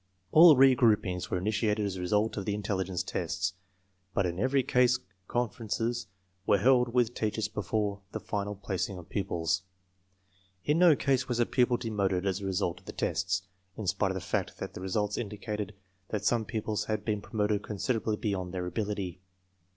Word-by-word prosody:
All 160 -1 +9
re 135 0 +7
groupings 105 -7 +2
were - - 0
initiated 105 +2 0
as 100 -2 -2
a - - -6
result 105 +4 +1
of 100 - -4
the 105 - 0
intelligence 95 -3 -2
tests, 95 +1 -2 0.6
but 100 - +2
in 85 0 -2
every 130 +4 +2
case 125 +1 +4 0.3
conferences 120 -1 -2 0.4
were 100 - +5
held 125 +3 +4
with 120 -1 +2
teachers 110 -2 -1
before 105 0 -2
the - - -4
final 105 0 -3
placing 95 -1 -3
of 90 0 -11
pupils. 85 -3 0 1.0
In 150 +3 +2
no 175 -4 +7
case 135 -2 +1
was 120 -1 0
a 120 - +4
pupil 125 -1 +2
demoted 100 -5 -1
as 95 0 0
a - - -4
result 90 -2 -1
of - - -26
the - - -6
tests, 90 0 0 0.3
in 110 - -4
spite 95 +1 +1
of 95 - -2
the 95 - -3
fact - - -2
that - - -6
the - - -8
results 105 +2 -1
indicated 105 -2 -4 0.3
that 105 -1 -3
some 115 -1 +2
pupils 110 -1 -2
had 110 -1 -2
been 105 -2 -1
promoted 105 -1 0
considerably 110 +1 -1
beyond 95 -4 -2
their 90 -1 -2
ability. 95 -1 -3
105 Hz, 180 wpm, -30 LUFS, 95-115 Hz, 1.0 s, All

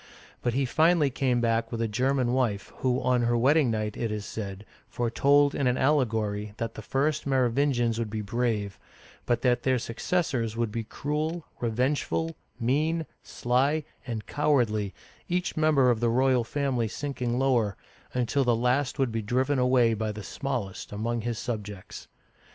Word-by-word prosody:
But 120 -1 -1
he 135 0 +2
finally 155 +2 +3
came 125 -2 +1
back 115 -1 +1
with 115 - -3
a 115 - +1
German 125 +2 +1
wife, 115 -6 -1
who 130 -1 +1
on 125 -1 +2
her 120 0 +2
wedding 140 +3 +4
night, 110 -2 -2
it 115 -2 -2
is 105 -1 -4
said, 100 -1 -6 0.2
foretold 140 +4 +3
in 135 - 0
an 125 +1 +2
allegory 110 -7 0
that 115 0 -3
the - - -8
first 140 +6 0
Merovingians 125 -2 +2
would 115 -2 -2
be 110 0 -3
brave, 105 -3 -1 0.5
but 120 -1 +1
that 120 -1 +3
their 130 0 +2
suc 115 -1 -6
cessors 130 -11 0
would 115 -2 -1
be 115 +1 -3
cruel, 155 +7 -3
revengeful, 135 +7 0 0.2
mean, 155 +7 +1 0.2
sly, 135 +6 0 0.2
and 110 -3 -4
cowardly, 120 -9 +1 0.4
each 180 +1 -1
member 150 -5 +4
of 115 - 0
the 120 0 +2
royal 130 +1 +3
family 130 -2 -1
sinking 125 -1 -3
lower, 120 -7 +1 0.3
until 125 +3 +1
the 120 -2 +3
last 125 +4 +1
would 135 -3 +1
be 115 0 -2
driven 130 +6 +1
away 125 -2 +4
by 110 0 -2
the 105 0 -7
smallest 120 -3 -4
among 115 +3 -2
his 120 0 -3
sub 110 -3 -3
jects. 100 -2 -10
120 Hz, 170 wpm, -27 LUFS, 115-135 Hz, 0.5 s, wedding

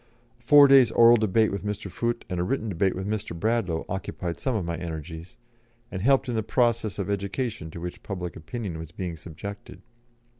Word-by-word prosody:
A - - -28
four 145 +3 +8
days' 135 -4 +7
oral 115 +1 +7
debate 110 0 +2
with 100 - -4
Mr. 105 0 -4
Foote, 120 +5 -2
and 90 -2 -3
a - - +1
written 115 +2 -1
debate 95 0 +1
with 95 +1 -4
Mr. 100 -5 -3
Bradlaugh, 105 -6 0
occupied 90 -2 -4
some 130 -3 -1
of 100 -5 -1
my 85 0 -2
energies, 80 0 -7 0.5
and 95 - -4
helped 135 +4 +3
in 120 - -2
the 110 - 0
process 115 -2 +1
of 100 - -2
education 100 0 -3
to 85 - -8
which 90 +1 -6
public 90 -3 -5
opinion 85 +1 -5
was 80 -1 -8
being 90 -1 -5
subjected. 85 +6 -9
100 Hz, 195 wpm, -26 LUFS, 85-115 Hz, 0.5 s, four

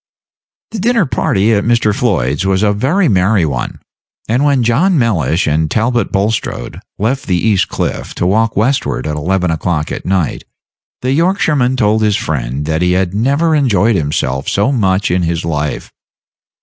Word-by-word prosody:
The 225 - -5
dinner 230 -1 +2
party 110 -5 +1
at 100 -1 +1
Mr. 115 -3 +2
Floyd's 90 - 0
was 95 +1 +1
a 105 -1 +2
very 155 - +1
merry 95 - +2
one; 65 -5 -4 0.5
and 120 +5 +1
when 140 -4 +2
John 155 +11 +2
Mellish 95 - +1
and 80 +1 0
Talbot 120 +4 0
Bulstrode 100 - -2 0.2
left 125 +7 -2
the 90 -3 +1
East 100 0 +1
Cliff - - -4
to - - -1
walk 110 +4 +1
westward 130 +6 0
at 75 -1 -2
eleven 90 +3 0
o'clock 80 -1 -2
at - - -5
night, 90 -3 -1 0.6
the 130 - 0
Yorkshireman 150 -6 +1
told 110 -2 +2
his 105 -2 +2
friend 70 -1 -3
that 80 +1 -1
he 90 0 +2
had 90 -1 0
never 140 +10 +1
enjoyed 115 -7 +2
himself 70 -4 -1
so 105 +7 +1
much 100 -6 +1
in 90 +1 +1
his 85 0 -2
life. 75 -3 -3
100 Hz, 165 wpm, -14 LUFS, 85-125 Hz, 0.6 s, dinner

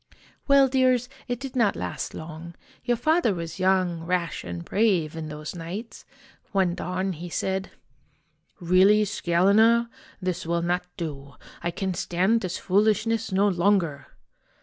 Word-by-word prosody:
"Well, 280 -1 +6
dears, 255 -2 +2 0.2
it 245 -2 -3
did 270 0 -7
not 230 -5 +2
last 90 -1 -5
long. 160 +1 -8 0.3
Your 240 -1 +1
father 310 - +2
was 165 -1 -6
young, 185 -3 +2
rash, 175 0 -2
and 85 -1 -6
brave, 185 -8 +1
in 160 -1 -5
those 150 0 -6
nights. 180 +7 -7 0.5
One 190 -3 +2
dawn 185 +2 -2
he 175 +2 -8
said, 190 +2 -2 0.5
' - - -43
Really, 190 +4 +5
Scalena, 215 +5 +3 0.3
this 185 -2 -3
will 170 +1 -1
not 180 +1 -1
do. 140 -5 -6 0.3
I 175 - -1
can 190 +2 -3
stand 190 +7 +1
this 185 -1 -3
foolishness 215 +3 +1
no 195 +2 +3
longer 175 -6 +1
185 Hz, 145 wpm, -25 LUFS, 170-220 Hz, 0.5 s, Well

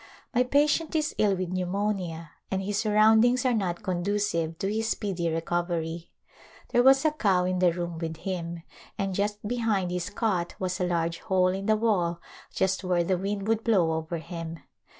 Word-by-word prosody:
My 250 - +3
patient 295 +5 +2
is 305 -1 0
ill 205 -2 +3
with 185 -1 -3
pneumonia 185 -3 -2 0.2
and 190 0 -1
his 200 +1 -1
surroundings 220 +4 +4
are 255 - +3
not 195 -2 -1
conducive 180 -3 -1
to 195 - -2
his 220 +1 -1
speedy 185 -7 -1
recovery. 165 0 -2 0.6
There 245 - +3
was 270 +3 +5
a 310 - +4
cow 195 -11 +2
in 185 0 0
the 180 -1 +4
room 170 -1 -4
with 165 -1 -4
him, 170 -2 -4 0.3
and 195 -2 -1
just 205 +2 -2
behind 215 -6 0
his 180 -1 -2
cot 190 -7 -1
was 185 0 -2
a 180 - +1
large 170 -1 -1
hole 185 -3 +2
in 195 +2 -3
the 215 - +4
wall 180 -7 +1 0.3
just 190 +1 0
where 180 -2 +1
the 185 +2 +1
wind 200 +1 -3
would 225 0 +1
blow 190 -8 +3
over 160 +1 -3
him. 165 0 -7
185 Hz, 180 wpm, -27 LUFS, 170-215 Hz, 0.6 s, was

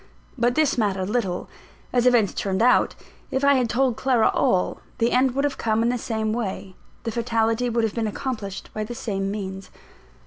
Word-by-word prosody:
But 245 -1 +1
this 305 -5 +2
mattered 195 -2 0
little. 195 -7 -1 0.5
As 245 0 +3
events 235 -5 +4
turned 195 +2 -1
out, 250 - +4 0.3
if 265 - -1
I 280 0 +6
had 250 -4 +1
told 250 -1 +1
Clara 250 -4 +3
all, 180 - +1 0.2
the 230 +1 +2
end 255 0 +3
would 275 - +1
have 290 -1 -1
come 220 0 +1
in 235 - +2
the 250 - 0
same 220 -2 -2
way, 195 -4 -4 0.3
the 230 - -2
fatality 230 +1 0
would 230 0 +1
have 220 - 0
been 230 -2 -1
accomplished 210 -4 -5
by 215 - -2
the 240 +3 -6
same 195 -4 -2
means. 195 -2 -5
230 Hz, 195 wpm, -24 LUFS, 205-245 Hz, 0.5 s, I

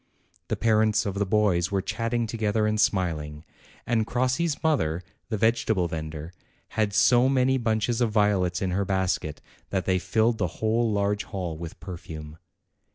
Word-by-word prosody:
The - - -1
parents 110 -1 +2
of 100 - -1
the 100 0 -1
boys 95 -4 +2
were 100 - 0
chatting 115 +2 -1
together 110 -1 0
and 110 0 +1
smiling, 80 -7 -1 0.4
and 110 -2 +1
Crossi's 130 +6 0
mother, 90 - +1 0.3
the 110 - -1
vegetable 110 -4 +2
vendor, 80 0 -6 0.4
had 110 -2 0
so 120 +4 +4
many 130 0 +2
bunches 115 +1 0
of 120 - +3
violets 100 -4 +1
in 95 - -1
her 100 +3 +1
basket, 95 -6 -1 0.3
that 95 -2 -1
they 95 -1 +2
filled 110 +6 +1
the 90 - +1
whole 110 +1 +1
large 100 0 0
hall 90 -5 -4
with 85 0 -8
perfume. 80 -4 -8
105 Hz, 160 wpm, -26 LUFS, 90-115 Hz, 0.4 s, so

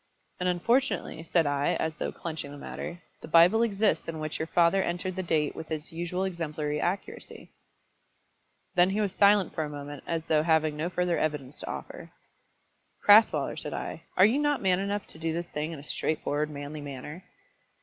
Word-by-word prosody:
"And 180 0 +1
unfortunately," 235 - +1
said 165 0 +2
I, 145 0 +1
as 160 - -1
though 150 - -3
clenching 160 -4 -6
the 145 - -9
matter, 170 +4 -7 0.2
"the - - -8
Bible 175 +7 +6
exists 215 -2 +1
in 165 -1 -4
which 155 0 -4
your 160 - -2
father 175 +3 +3
entered 175 +1 -2
the 190 - -2
date 155 -4 0
with 160 - -7
his 155 +2 -4
usual 175 +3 -2
exemplary 155 -5 -2
accuracy." 190 +3 -4 1.2
Then 180 0 +5
he 200 +2 -1
was 200 -3 0
silent 200 -2 +4
for 160 - -1
a 150 - -4
moment 145 -1 -7
as 165 -1 -1
though 155 -2 +3
having 160 -1 +2
no 155 +3 -2
further 180 -1 0
evidence 150 -3 -2
to - - -7
offer. - - -7 1.0
"Crasweller," 210 +2 +6
said - - -5
I, - - -5 0.2
"are 185 - +8
you 235 +7 +3
not 295 -1 +2
man 185 -2 +2
enough 200 +1 -2
to 160 - -15
do 165 0 -1
this 170 +1 -4
thing 150 +2 -3
in 165 - -6
a 140 - -10
straightforward, 150 0 -1
manly 145 +1 -6
manner?" 145 +5 -8
165 Hz, 190 wpm, -28 LUFS, 150-185 Hz, 1.2 s, are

